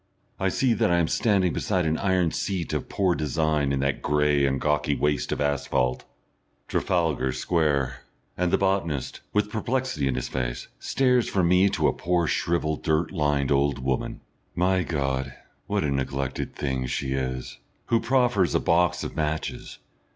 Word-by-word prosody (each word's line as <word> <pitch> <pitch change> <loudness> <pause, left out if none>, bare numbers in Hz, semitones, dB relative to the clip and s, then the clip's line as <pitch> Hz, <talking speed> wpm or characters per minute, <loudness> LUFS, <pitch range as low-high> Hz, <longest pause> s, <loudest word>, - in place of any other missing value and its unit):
I 95 -1 +1
see 125 +5 +2
that 110 0 +1
I 85 - +3
am 85 -2 +2
standing 95 -6 +2
beside 90 -4 0
an 80 0 0
iron 95 -4 +2
seat 95 -5 -2
of - - -3
poor 95 -3 +1
design 75 -2 0
in 70 -1 0
that 70 +1 -1
grey 75 -1 +2
and 70 0 0
gawky 75 -1 +1
waste 75 0 0
of - - 0
asphalte 70 -3 0 0.6
Trafalgar 80 -7 0
Square, 70 -7 0 0.3
and 90 0 0
the - - +3
botanist, 95 -8 -1
with 105 0 0
perplexity 115 - -1
in 65 - 0
his 65 - -2
face, - - -4
stares 125 -2 +2
from 90 -3 +2
me 90 +2 +5
to - - +1
a - - +2
poor, 90 -1 0
shrivelled, 80 -1 0
dirt 80 +2 +1
lined 75 -5 0
old 70 -1 +2
woman 65 0 -2 0.3
my 95 +1 +2
God! 70 -5 -2 0.3
what - - 0
a 75 - 0
neglected 70 -1 -2
thing 65 -2 -2
she 65 +2 -2
is! 65 -1 -4 0.3
who 115 - +2
proffers 120 -7 +2
a - - +4
box 90 +1 +2
of - - -6
matches.... 80 0 -3
80 Hz, 165 wpm, -25 LUFS, 70-90 Hz, 0.6 s, me